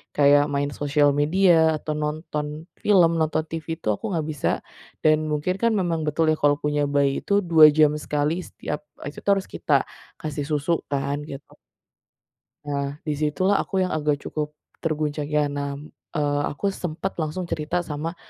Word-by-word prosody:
kayak 145 0 +5
main 140 0 0
sosial 145 +1 +2
media 160 0 +4
atau 155 - -3
nonton 150 +1 -4
film, 185 -5 +5
nonton 155 0 +1
TV, 160 -2 -5
itu 155 - -9
aku - - -9
enggak 160 -3 -1
bisa, 150 - -1 0.5
dan 155 0 +5
mungkin 150 +5 0
kan 230 0 +3
memang 175 -5 0
betul 155 +2 +1
ya 155 - 0
kalau 145 0 +3
punya 150 0 0
bayi 140 -1 +1
itu 200 - 0
2 165 -4 +7
jam 150 -1 +6
sekali 150 +3 -1
setiap, - - -5 0.2
eee, - - -4
itu - - -11
tuh 200 - +4
harus 195 - -3
kita - - -1 0.5
kasih 145 -2 -3
susu 150 +2 +1 0.2
kan, 140 0 -1
gitu. 140 0 -10 1.1
Nah, 140 -1 -3
di 155 - -1
situlah 185 +7 +2
aku 190 -2 0
yang 185 - -2
agak 150 -1 +1
cukup 150 0 -4 0.2
terguncangnya, 150 -2 -1
nah, 140 +1 -5 0.2
eee, 145 -1 +1
aku 195 +7 -1
sempat 180 +1 -4
langsung 160 +3 -2
cerita 165 +3 -1
sama 160 +3 -4
150 Hz, 165 wpm, -24 LUFS, 145-165 Hz, 1.1 s, 2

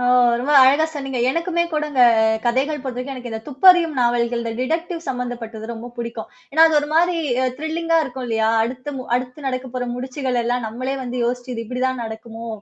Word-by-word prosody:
ஓ, 245 - 0 0.3
ரொம்ப 285 +4 0
அழகா 280 +4 +5
சொன்னீங்க. 270 -3 -4
எனக்குமே 335 +3 0
கூடங்க 300 -3 -1 0.5
கதைகள் 275 +5 +1
பொறுத்தவரைக்கும் 260 +1 -5
எனக்கு 245 -2 -7
இந்த 220 0 -4
துப்பறியும் 330 +2 +5
நாவல்கள், 240 -1 +1
இந்த 230 - -3
டிடக்டிவ் 330 +5 -2
சம்மந்தப்பட்டது 235 -3 -5
ரொம்ப 230 +2 -8
பிடிக்கும். 235 -1 -5 0.2
ஏன்னா, 320 +3 +7
அது 315 -2 +2
ஒருமாரி 330 +4 +2 0.4
த்ரில்லிங்கா 330 +1 0
இருக்கும் 255 -1 -6
இல்லையா? 220 -1 +1 0.2
அடுத்த 255 +4 -5 0.2
அடுத்து 255 +3 -6
நடக்கப் 255 -1 -4
போற 245 - -2
முடிச்சுகள 255 -1 -2
எல்லாம் 245 -1 -1
நம்மளே 255 +5 -3
வந்து 250 0 -4
யோசிச்சு, 245 +1 -3
இது 230 - -4
இப்பிடிதான் 255 +1 -2
நடக்குமோ! 225 +1 -8
255 Hz, 165 wpm, -21 LUFS, 240-295 Hz, 0.5 s, ஏன்னா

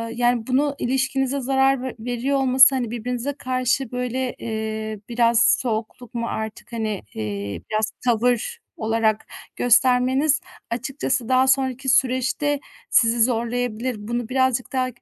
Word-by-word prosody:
yani, 240 -1 +1
bunu 280 +2 +1
ilişkinize 270 +1 0
zarar 270 0 +2
ve 260 - -5
veriyor 245 +4 -1
olması, 265 0 +6
hani, 245 -4 -2
birbirinize 245 +3 -3
karşı, 255 -1 -1
böyle, 250 +1 -2
eee, 220 -1 -4
biraz 235 0 +4
soğukluk 230 0 -4
mu 235 -1 -2
artık, 220 +2 -6
hani, 215 -3 -2
eee, 100 -2 -4
biraz 215 0 0
tavır 245 - +1 0.2
olarak 220 -1 0 0.3
göstermeniz 255 +5 +3 0.3
açıkçası 255 0 -2
daha 260 0 +4
sonraki 265 0 +1
süreçte 260 +3 +1 0.3
sizi 230 0 +3
zorlayabilir. 240 0 0
Bunu 235 +2 -4
birazcık 260 -1 0
daha 255 -1 +1
245 Hz, 125 wpm, -22 LUFS, 230-260 Hz, 0.3 s, olması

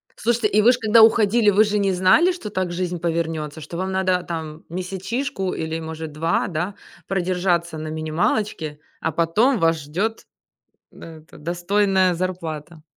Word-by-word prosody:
Слушайте, 235 0 +1
и 210 0 +3
вы 235 +4 +6
же 245 - -3
когда 220 0 +5
уходили, 220 0 +4
вы 205 +2 +5
же 210 -1 0
не 195 -1 +2
знали, 190 - +4
что 350 -12 -6
так 185 -3 -2
жизнь 175 0 -3
повернётся, 160 -2 -2
что 155 +3 -7
вам 190 +1 -2
надо 185 -1 +1
там 160 -2 -6
месячишку 190 +4 -3
или, 160 0 -3
может, 160 -1 -6
2, 155 +3 0
да, 180 +3 -3 0.3
продержаться 175 -3 0
на 155 0 -5
минималочке, 155 0 -2 0.2
а 160 - -1
потом 205 - +2
вас 165 0 +3
ждёт, 185 +10 -3 0.7
да, 165 -1 -11
это 155 - -17
достойная 185 +3 +1
зарплата. 165 -3 -5
180 Hz, 155 wpm, -22 LUFS, 160-205 Hz, 0.7 s, вы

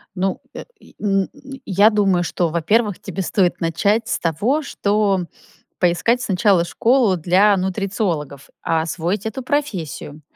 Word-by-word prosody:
Ну, 190 0 -1
э, - - -7 0.2
и, - - -20
м, 195 -2 +1 0.4
я 200 +2 +4
думаю, 195 -5 +2
что, 170 0 -1
во-первых, 205 +5 +1
тебе 195 0 -5
стоит 185 -1 0
начать 200 +7 +1
с - - -1
того, 210 - 0
что 200 -7 0 0.5
поискать 180 +8 +2
сначала 190 -4 +2
школу 230 +1 +2
для 185 +5 +3
нутрициологов, 185 - -3
а, 160 -1 0
освоить 175 +5 -3
эту 220 +4 -4
профессию. 190 - -3
195 Hz, 135 wpm, -20 LUFS, 175-210 Hz, 0.5 s, я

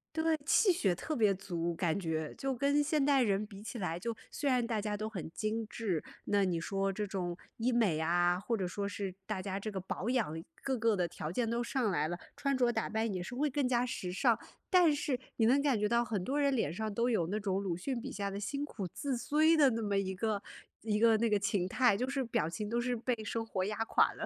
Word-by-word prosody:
对， 320 0 +2
气 385 +5 +5
血 200 - +2
特 310 - -4
别 215 -5 +4
足 175 -3 -3
感 165 0 0
觉， 160 -4 -2
就 270 0 -1
跟 280 +3 +2
现 300 0 +1
代 275 -2 +4
人 205 -2 +1
比 200 -1 -11
起 230 - -6
来， 170 -4 -2
就 230 +6 -3 0.2
虽 285 - -1
然 250 -2 +2
大 225 -3 0
家 210 0 -2
都 215 +1 -3
很 190 -7 -6
精 220 +4 -2
致， 195 -10 -2 0.2
那 205 -1 +2
你 180 -3 +1
说 195 +3 -1
这 210 +2 -3
种 180 -3 -3 0.2
医 235 +3 0
美 220 -10 +3
啊， 175 +2 +2
或 225 +5 -1
者 190 -3 -1
说 200 +3 -3
是 200 -2 -4
大 205 -2 -3
家 195 0 -3
这 215 +2 -4
个 195 - -3
保 190 +3 -3
养 180 -11 0 0.2
各 265 -1 0
个 225 -2 +2
的 180 -1 +1
条 165 -2 -5
件 230 +4 0
都 235 +1 0
上 240 -1 0
来 155 -3 0
了， 175 - -3 0.2
穿 275 -1 0
着 245 -2 +3
打 220 - -1
扮 220 +1 0
也 180 -1 -3
是 175 - -7
会 290 +4 +1
更 280 0 0
加 250 -1 +2
时 190 -7 -4
尚， 230 +4 +3 0.3
但 355 -5 +6
是， 285 -2 -1 0.2
你 225 - +4
能 265 +5 +5
感 275 -6 +2
觉 210 - +2
到 235 +2 +3
很 215 -4 -2
多 275 +3 -1
人 280 -1 +3
脸 220 - 0
上 215 +2 -3
都 235 +4 +1
有 195 -9 +1
那 205 +4 -1
种 195 -1 -1
鲁 175 -4 -1
迅 240 +6 -3
笔 - - -6
下 200 0 -2
的 195 - -5
辛 280 +8 -2
苦 210 -9 -5
自 275 -2 -2
摧 310 +6 +3
的 295 -4 +6
那 230 -2 -2
么 205 -2 0
一 190 -1 0
个 210 +1 -1 0.4
一 210 -1 0
个 225 0 +6
那 230 +1 +2
个 210 -1 +3
形 195 -2 0
态， 245 -1 +4
就 250 +5 -1
是 275 0 -1
表 165 -9 0
情 210 +5 -4
都 235 +3 0
是 245 0 -1
被 245 +2 0
生 225 +1 -2
活 190 -4 -2
压 210 +2 -2
垮 - - +3
的。 - - -4
215 Hz, 275 characters per minute, -33 LUFS, 190-250 Hz, 0.4 s, 但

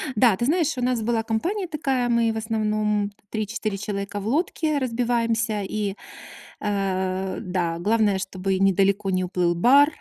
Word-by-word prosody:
Да, 215 -2 +5
ты 235 - -1
знаешь, 320 -1 +1
у - - -2
нас 245 -2 +1
была 225 -1 0
компания 355 - -1
такая, 270 -6 -1
мы 230 -1 +3
в 220 - -4
основном 215 -2 0 0.2
3-4 215 -1 -3
человека 200 0 -4
в 205 - -5
лодке 310 +2 0
разбиваемся. 230 -3 0
И, 200 0 -2 0.6
а-а, 190 -2 -1
да, 175 -2 -2
главное, 210 0 +2
чтобы 190 0 -2
недалеко 195 +1 +2
не 185 0 +1
уплыл 175 -1 0
бар, 280 - +6
215 Hz, 150 wpm, -24 LUFS, 195-240 Hz, 0.6 s, бар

